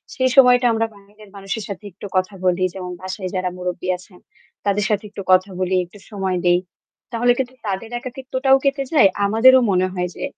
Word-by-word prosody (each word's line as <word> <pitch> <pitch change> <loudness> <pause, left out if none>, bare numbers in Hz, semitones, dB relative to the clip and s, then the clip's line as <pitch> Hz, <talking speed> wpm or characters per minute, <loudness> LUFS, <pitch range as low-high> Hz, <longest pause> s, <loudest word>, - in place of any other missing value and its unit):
সেই 260 0 +2
সময়টা 250 -2 +6
আমরা 225 0 +1
বাইরের 205 +1 -18
মানুষের 200 +2 -5
সাথে 200 +1 -7
একটু 185 - -11
কথা 185 +2 0
বলি। 180 0 +2
যেমন 180 -2 -6
বাসায় 185 0 -5
যারা 185 0 -1
মুরুব্বি 180 0 -4
আছেন 180 0 -18 0.5
তাদের 205 0 +1
সাথে 210 0 0
একটু 200 -1 -8
কথা 185 +2 +4
বলি, 185 0 0
একটু 175 +4 -17
সময় 190 -3 -2
দেই। 175 0 +4 0.5
তাহলে 245 +1 +2
কিন্তু 255 -1 -3
তাদের 195 +3 -3
একাকিত্বটাও 260 +1 +1
কেটে 275 0 +1
যায়। 285 -10 +7 0.2
আমাদেরও 235 +6 +6
মনে 185 0 +2
হয় 180 -1 -2
যে - - -7
200 Hz, 185 wpm, -20 LUFS, 185-245 Hz, 0.5 s, যায়